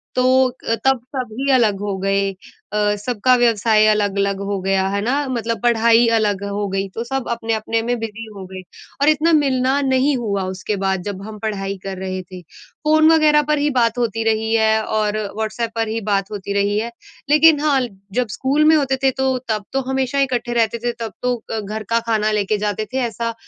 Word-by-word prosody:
तो 255 - +2 0.4
अ, 230 - +2
तब 265 -2 +3
सभी 255 +2 -2
अलग 220 -6 +3
हो 200 -2 -2
गए। 195 +1 0 0.4
अ, 210 0 +1
सबका 245 +4 +1
व्यवसाय 225 -3 +3
अलग-अलग 200 -2 +1
हो 200 - -1
गया, 190 0 +1
है 200 +1 -1
ना? 275 +6 0
मतलब 230 -2 -2
पढ़ाई 235 0 +4
अलग 205 -2 0
हो 200 0 -2
गई, 195 +1 -2
तो 230 - -3
सब 265 +1 -3
अपने-अपने 225 -1 -1
में 240 +1 -1
बिज़ी 225 0 -6
हो 195 -1 -8
गए। 185 0 -7 0.4
और 290 - +5
इतना 310 +2 +3
मिलना 270 -2 +2
नहीं 270 +1 +2
हुआ 200 -5 -2
उसके 190 +3 -3
बाद 190 -1 0
जब 200 -1 -5
हम 215 0 -9
पढ़ाई 200 -3 -3
कर 195 -1 -5
रहे 185 0 -4
थे, 180 0 -11 0.4
फ़ोन 310 +1 +5
वग़ैरह 305 -2 +5
पर 300 - +3
ही 295 +1 +1
बात 230 -1 +2
होती 225 -2 -1
रही 220 0 0
है 220 -1 +3
और 215 -1 -1 0.2
व्हाट्सएप 220 +1 -3
पर 225 -1 0
ही 225 +1 -2
बात 195 0 0
होती 200 -1 -4
रही 200 +1 +1
है। 230 +2 -4 0.4
लेकिन 305 +1 +6
हाँ, 285 -3 +2 0.3
जब 250 +1 0
स्कूल 275 +6 +1
में 315 +1 +6
होते 275 -3 +1
थे, 265 - +4
तो 265 0 0
तब 215 -2 -1
तो 270 - +1
हमेशा 265 +1 0
इकट्ठे 245 -3 0
रहते 230 -1 +1
थे 240 - +1
तब 225 -2 -5
तो 250 0 +1 0.2
अ, 225 - -1
घर 215 +1 -5
का 230 0 +3
खाना 215 -1 +1
लेके 210 0 0
जाते 210 +1 -2
थे - - -1
ऐसा 230 +1 -4
225 Hz, 205 wpm, -19 LUFS, 205-255 Hz, 0.4 s, लेकिन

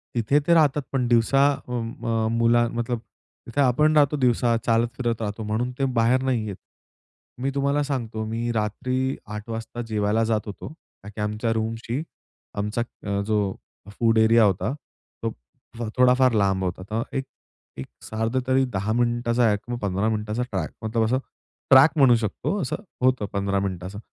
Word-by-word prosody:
तिथे 120 +6 +3
ते 170 - +5
राहतात. 150 -3 +4
पण 130 -3 0
दिवसा, 120 +4 +4
अं, 120 -3 -5
अ, - - -16
म्हणजे 115 0 0
मुला 120 0 +4
मतलब, 120 0 -2 0.5
तिथे 130 +5 0
आपण 150 +4 +3
राहतो 145 0 +4
दिवसा, 120 -1 +2
चालत-फिरत 115 0 0
राहतो 105 0 -3
म्हणून 110 +4 -1
ते 135 - +2
बाहेर 120 +3 +3
नाही 125 -5 0
येत. 100 - -5 0.9
मी 135 +1 0
तुम्हाला 140 +1 +1
सांगतो, 120 -6 -3
मी 115 +2 -2
रात्री 125 +5 -1 0.2
8 105 +2 -8
वाजता 115 +1 -5
जेवायला 110 +1 +1
जात 105 - +1
होतो, 105 - -7 0.4
का 105 - -9
की 105 0 -7
आमच्या 105 +2 -1
रूमशी 115 +4 -2 0.6
आमचा, 105 +3 -1 0.2
अ, 100 0 -1
जो 105 -3 0 0.4
फूड 115 -1 +3
एरिया 110 +1 +5
होता 100 +7 0 0.5
तो - - +1 0.5
फ 120 - -6 0.2
थोडाफार 125 0 +5
लांब 95 -1 +1
होता. 90 0 -3
तर 115 +2 0
एक-एक 130 - -10 0.2
साधारण 115 +4 -1
तरी 130 0 +3
10 100 +3 -1
मिनिटाचा 120 0 +1
ट्रॅक, 100 - -6
मग 120 - -2
15 100 +2 0
मिनिटाचा 105 +1 -2
ट्रॅक, 90 -5 -2
मतलब 110 +1 0
असं, 125 +4 +1 0.5
ट्रॅक 135 +4 +7
म्हणू 130 -4 +6
शकतो, 115 - -2
असं 130 - -3 0.2
होतं 130 -5 +2
15 100 0 0
मिनिटाचा. 95 +1 -4
115 Hz, 165 wpm, -24 LUFS, 105-125 Hz, 0.9 s, ट्रॅक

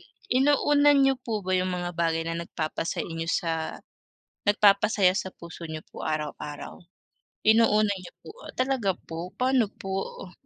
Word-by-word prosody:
I - - -19 0.4
inuuna 290 +1 +4
niyo 270 -1 +5
po 235 - -4
ba 185 - -1
yung 185 0 -1
mga 175 0 -3
bagay 165 -1 +1
na 165 0 -2
nagpapasay 165 0 -3
inyo 165 0 -4
sa 165 -1 -2 1.0
nagpapasaya 205 -2 +5
sa 190 - -3
puso 170 0 -11
niyo 155 -1 -6
po - - -19 0.2
araw-araw. 150 -1 -5 0.8
Inuuna 215 -2 +5
niyo 180 -1 -11
po - - -12 0.2
ah, - - -8
talaga 255 -6 +1 0.2
po, 165 0 -6 0.2
pa'no 255 -2 +3 0.2
po 195 - -5 0.4
uh? - - -14
190 Hz, 155 wpm, -27 LUFS, 165-240 Hz, 1.0 s, niyo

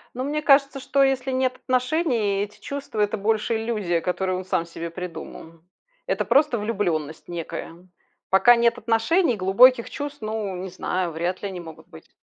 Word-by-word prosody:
Ну, 255 - -3
мне 300 +2 -2
кажется, 275 -1 +4
что 275 +1 +1
если 265 -1 +1
нет 255 0 0
отношений, 255 - 0
и - - +1
эти 210 0 -14
чувства- 280 -6 -5
это 210 +1 +1
больше 220 +2 0
иллюзия, 210 -7 -1
которую 185 +2 -1
он 185 - -6
сам 175 -2 0
себе 170 0 -7
придумал. 165 -1 -9 0.5
Это - - 0
просто 285 -3 +3
влюбленность 180 -9 -2
некая. 170 +1 -7 0.4
Пока 195 +6 +7
нет 235 0 +2
отношений, 235 - +2
глубоких 235 +6 +5
чувств, 290 0 -6
ну, 215 -3 -3
не 185 +1 -6
знаю, 180 -1 -2
вряд 170 +3 -3
ли, 200 - -2
они 185 -2 -7
могут 160 -1 -11
быть. 160 -2 -16
210 Hz, 170 wpm, -24 LUFS, 180-255 Hz, 0.5 s, Пока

